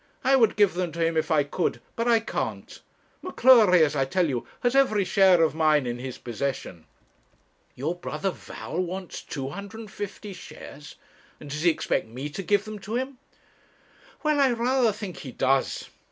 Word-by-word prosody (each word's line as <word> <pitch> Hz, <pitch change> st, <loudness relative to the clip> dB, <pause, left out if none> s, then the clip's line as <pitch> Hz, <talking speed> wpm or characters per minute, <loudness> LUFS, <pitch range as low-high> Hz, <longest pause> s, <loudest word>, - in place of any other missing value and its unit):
I 270 Hz, +1 st, +4 dB
would 230 Hz, -5 st, +4 dB
give 205 Hz, -3 st, +4 dB
them 175 Hz, -1 st, -2 dB
to 165 Hz, 0 st, 0 dB
him 165 Hz, 0 st, 0 dB
if 160 Hz, -, 0 dB
I 155 Hz, -3 st, +3 dB
could, 155 Hz, +5 st, -2 dB, 0.2 s
but 230 Hz, +1 st, -1 dB
I 230 Hz, -1 st, +5 dB
can't. -, -, -5 dB, 0.4 s
M'Cleury, 230 Hz, -, +6 dB
as 150 Hz, -1 st, +1 dB
I 135 Hz, -, +2 dB
tell 175 Hz, +6 st, +1 dB
you, 125 Hz, -5 st, -3 dB
has 245 Hz, +1 st, +1 dB
every 215 Hz, -7 st, +4 dB
share 190 Hz, -3 st, +5 dB
of 155 Hz, -3 st, +2 dB
mine 155 Hz, -3 st, +3 dB
in 120 Hz, 0 st, -3 dB
his 130 Hz, 0 st, -6 dB
possession.' 120 Hz, -, -5 dB, 0.9 s
'Your 145 Hz, +7 st, -2 dB
brother 180 Hz, +2 st, -3 dB
Val 175 Hz, -, -7 dB
wants 185 Hz, 0 st, -4 dB
250 200 Hz, +7 st, -7 dB
shares! 150 Hz, -4 st, -11 dB, 0.4 s
And 145 Hz, -, -10 dB
does 150 Hz, +2 st, -3 dB
he 175 Hz, -, +5 dB
expect 160 Hz, -, -1 dB
me 130 Hz, +6 st, -6 dB
to 195 Hz, -, -5 dB
give 205 Hz, +3 st, +1 dB
them 215 Hz, -1 st, -7 dB
to 215 Hz, +3 st, -5 dB
him?' 260 Hz, +1 st, -3 dB, 1.0 s
'Well 305 Hz, -1 st, +2 dB
I 270 Hz, -3 st, +4 dB
rather 240 Hz, 0 st, +2 dB
think 200 Hz, -4 st, -7 dB
he 130 Hz, -, -8 dB
does. 135 Hz, +2 st, 0 dB
180 Hz, 175 wpm, -26 LUFS, 150-220 Hz, 1.0 s, M'Cleury